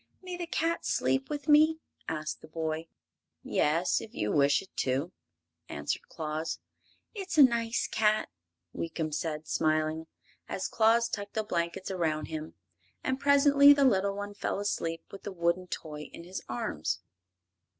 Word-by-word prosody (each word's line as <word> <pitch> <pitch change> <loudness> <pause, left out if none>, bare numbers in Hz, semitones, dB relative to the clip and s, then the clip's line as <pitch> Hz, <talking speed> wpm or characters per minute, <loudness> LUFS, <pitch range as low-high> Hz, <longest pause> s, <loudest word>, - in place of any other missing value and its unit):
"May 365 -1 -5
the 350 -1 -5
cat 330 0 0
sleep 265 0 +1
with 295 -1 -4
me?" 310 +1 +6 0.3
asked 155 -1 -4
the - - -12
boy. 160 0 -3 0.6
"Yes, 165 +4 +2
if 220 - -10
you 105 - -1
wish 140 +4 +4
it 190 - -20
to," 135 +6 0 0.6
answered 75 0 -3
Claus. 155 +1 -3 0.6
"It's 385 -6 -4
a 295 - +10
nice 235 -2 +2
cat!" 215 0 +2 0.4
Weekum 160 -2 -3
said, 155 -1 -3
smiling, 155 +1 0 0.4
as - - -2
Claus 230 +1 +4
tucked 205 -2 -5
the 220 - +1
blankets 170 -1 -2
around 160 -4 -1
him; 155 0 -6 0.5
and 260 0 -1
presently 280 0 +7
the 280 -1 +3
little 200 -4 +3
one 205 0 -5
fell 200 - -2
asleep 165 -5 -2
with 195 - -9
the 205 - -6
wooden 175 0 0
toy 150 -3 -6
in - - -10
his 180 +2 -6
arms. 120 - -2
185 Hz, 150 wpm, -30 LUFS, 155-250 Hz, 0.6 s, a